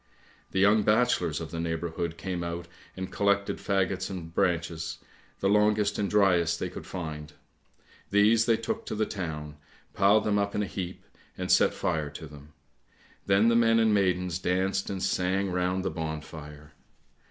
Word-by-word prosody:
The - - -5
young 105 +2 +5
bachelors 105 -7 +2
of 80 -1 -7
the 85 - -4
neighbourhood 85 0 -3
came 90 -2 -4
out 85 0 -5 0.3
and 95 0 -5
collected 100 0 +1
faggots 95 -1 -1
and 85 -4 -7
branches, 85 -2 -1 0.4
the 95 - +2
longest 105 0 +2
and 100 -2 0
driest 90 -5 +3
they - - -2
could - - -9
find. 75 -4 -6 0.8
These 110 +3 +4
they 115 -1 +4
took 225 - -3
to - - -3
the 110 +1 +1
town, 75 -7 -5 0.4
piled 100 +2 +4
them 105 -1 +1
up 100 0 -1
in 105 - +1
a - - -1
heap, 90 -1 -6 0.3
and - - -2
set - - +4
fire 75 -2 -1
to 75 +3 -9
them; 75 0 -13 0.7
then 100 +3 +4
the 115 - +3
men 115 -1 +4
and 110 -1 +4
maidens 90 -3 +1
danced 95 +2 0
and 95 -2 -3
sang 95 +1 0
round 90 +1 0
the 95 - 0
bonfire. 75 -2 -7
95 Hz, 165 wpm, -28 LUFS, 80-100 Hz, 0.8 s, young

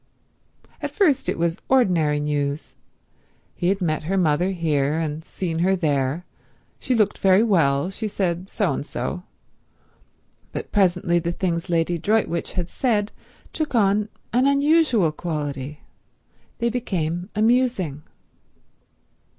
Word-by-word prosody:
At - - -2
first 320 - +2
it - - -1
was 170 0 -1
ordinary 175 - +3
news. 145 0 -2 0.8
He 175 - -2
had 195 +1 +1
met 155 -3 -1
her 195 +4 0
mother 175 +1 +2
here, 155 -5 0
and 160 -1 -3
seen 170 -1 -4
her 190 +3 +3
there. 150 -1 0 0.5
She 255 - 0
looked 215 -3 +1
very 190 +2 +5
well; 165 -6 +2
she 215 +3 -3
said 185 -2 -2
so 205 -5 0
and - - -3
so. 145 +6 -4 1.3
But - - -5
presently 175 -3 +2
the 170 0 -2
things 175 0 -2
Lady 170 0 +1
Droitwich 205 -2 0
had 180 -2 -2
said 215 -2 0 0.4
took 310 -5 -2
on 210 -1 +2 0.2
an 250 +3 +4
unusual 280 - +3
quality: 150 -3 -4 0.8
they 235 -1 0
became 180 -6 -2
amusing. 220 - +1
175 Hz, 125 wpm, -23 LUFS, 155-210 Hz, 1.3 s, very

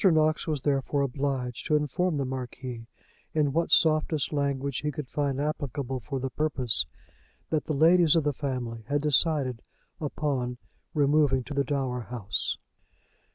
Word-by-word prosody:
Knox 155 -4 +3
was 150 -4 -1
therefore 140 0 +1
obliged 135 -2 -2
to 155 - +3
inform 150 +3 +1
the 140 - 0
Marquis 125 -2 -5 0.5
in 145 -3 +2
what 165 +2 +1
softest 155 -2 +3
language 140 -2 -1
he 150 - -1
could 150 -2 -5
find 140 -1 -1
applicable 140 -3 -2
for 135 +2 -4
the 130 0 -3
purpose 130 - 0 0.6
that 155 -2 +1
the 155 - -1
ladies 165 +2 +6
of 165 - +3
the 145 0 +1
family 125 -5 -3
had 145 +1 +1
decided 145 -4 +3 0.4
upon 140 -5 -2 0.4
removing 145 -2 +3
to 145 - -7
the 140 0 +2
dower 130 -3 -1
house. 115 -5 -2
140 Hz, 150 wpm, -28 LUFS, 130-150 Hz, 0.6 s, ladies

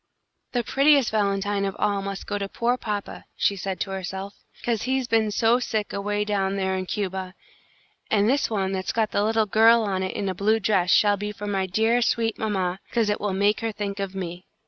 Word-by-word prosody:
"The 245 -1 +1
prettiest 275 +1 +4
valentine 200 -1 0
of 195 0 -2
all 200 -1 0
must 195 0 -5
go 205 - -3
to 200 0 -3
poor 240 +4 0
papa," 210 -5 -5
she 200 - +1
said 190 0 -4
to 195 - -2
herself, 190 +1 -5 0.3
"'cause 230 -3 0
he's 260 0 -1
been 225 -2 +2
so 230 +3 +3
sick 220 -4 -2
away 205 +1 -1
down 195 -2 0
there 190 -1 0
in 185 -1 -3
Cuba; 190 -2 -3 0.7
and 205 -1 +3
this 270 +4 +2
one 195 -4 -1
that's 190 -1 -2
got 220 -2 0
the 205 - +1
little 220 0 +2
girl 225 +3 +5
on 195 -3 -1
it 185 - -3
in 200 - -2
a 190 - -1
blue 215 +4 +2
dress 195 -4 +1
shall 205 0 +4
be 210 +1 -4
for 205 0 -8
my 195 -2 -1
dear, 225 +6 +2
sweet 230 -1 0
mamma, 190 -4 -1
'cause 225 -3 +1
it 205 - -2
will 205 -1 -1
make 205 +2 +2
her 225 -1 -2
think 205 -1 -4
of 195 -1 -4
me." 180 -1 -6
205 Hz, 215 wpm, -24 LUFS, 195-220 Hz, 0.7 s, girl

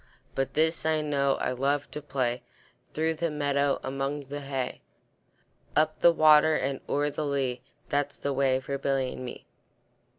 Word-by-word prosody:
But 135 0 -2
this 160 +2 +2
I 155 -1 +2
know, 140 -2 +1
I - - -1
love 140 +3 -1
to 150 - -5
play, 130 -4 -1 0.5
Through 160 +1 0
the 165 +1 -1
meadow, 145 -1 +1
among 135 +2 -2
the 145 +1 -7
hay; 135 -2 -3 0.9
Up 155 0 +2
the 170 - +7
water 155 -1 +6
and 135 -1 -1
o'er 145 +1 +1
the 155 - -3
lea, 135 -4 -1 0.3
That's 145 0 0
the 140 - -2
way 135 -1 +2
for 140 +1 -4
Billy 135 -2 0
and - - -7
me. 125 - -8
140 Hz, 165 wpm, -28 LUFS, 135-150 Hz, 0.9 s, the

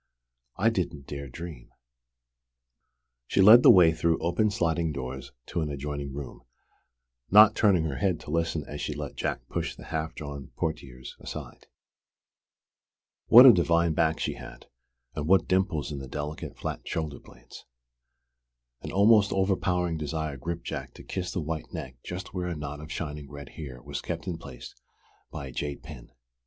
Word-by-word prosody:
"I 110 +5 +3
didn't 85 -9 -3
dare 70 0 -6
dream 80 -2 -9 0.8
" - - -55
She - - 0
led 110 +5 +9
the - - +7
way 85 -3 +8
through 80 +1 +1
open 85 +6 +1
sliding 85 -4 0
doors 65 -2 -6
to 85 - -3
an 75 - -2
adjoining 70 0 -4
room, 70 0 -8 0.9
not 105 +1 +8
turning 100 -6 +4
her 75 -4 -3
head 90 +3 0
to - - -8
listen 80 -1 0
as 75 - -6
she - - -3
let - - -6
Jack - - -3
push - - -3
the - - -12
half 80 0 -4
drawn 70 -2 -7
portières 65 -6 -4
aside. - - -9 1.6
What 125 +3 +10
a 125 - +11
divine 85 -2 +2
back 80 0 +1
she - - -1
had, - - -11 0.5
and 75 0 -4
what 95 +2 +4
dimples 90 -6 0
in 70 - -4
the 65 - -8
delicate, 75 +3 -6
flat - - -4
shoulder 80 -3 -3
blades! - - -15 1.2
An - - -6
almost 100 +1 +5
overpowering 90 -3 +1
desire 75 0 -3
gripped 85 +6 -5
Jack - - -5
to - - -12
kiss 90 -1 -4
the 90 - -2
white 80 0 -5
neck 65 -1 -7
just 90 +2 -7
where 90 -1 -2
a 85 - -3
knot 75 -1 -6
of 75 +1 -9
shining 75 -4 -5
red 70 0 -9
hair 70 -6 -8
was 70 -1 -5
kept 85 0 -5
in 90 -3 -4
place - - -10 0.6
by 70 - -6
a 65 - -8
jade 70 +3 -4
pin. 75 -6 -11
80 Hz, 170 wpm, -27 LUFS, 70-90 Hz, 1.6 s, a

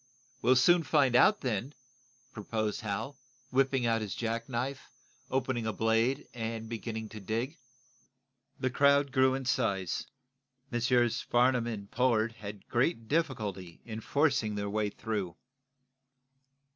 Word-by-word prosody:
"We'll 130 +2 +5
soon 170 +7 +5
find 140 -5 +2
out 210 +11 +5
then," 125 +2 -2 0.6
proposed 110 +1 -2
Hal, 110 +6 -4 0.3
whipping 135 -1 +2
out 115 -1 +2
his 105 -3 -4
jack 115 +1 -3
knife, 130 +3 -3 0.4
opening 130 -3 -1
a 110 - -1
blade 115 +5 +1
and 115 -1 -4
beginning 110 -1 -5
to 110 - -8
dig. 115 - -3 1.0
The 130 -1 0
crowd 140 +1 +4
grew 130 0 +4
in 135 -1 -4
size. 100 -8 0 0.6
Messrs. 120 0 +2
Farnum 120 -1 +2
and 100 -4 -6
Pollard 115 -2 +2
had 105 -3 -9
great 120 -1 0
difficulty 105 - -2
in 110 -1 -6
forcing 130 -6 +1
their 100 0 -3
way 105 0 0
through. 100 -5 -4
115 Hz, 130 wpm, -30 LUFS, 110-130 Hz, 1.0 s, We'll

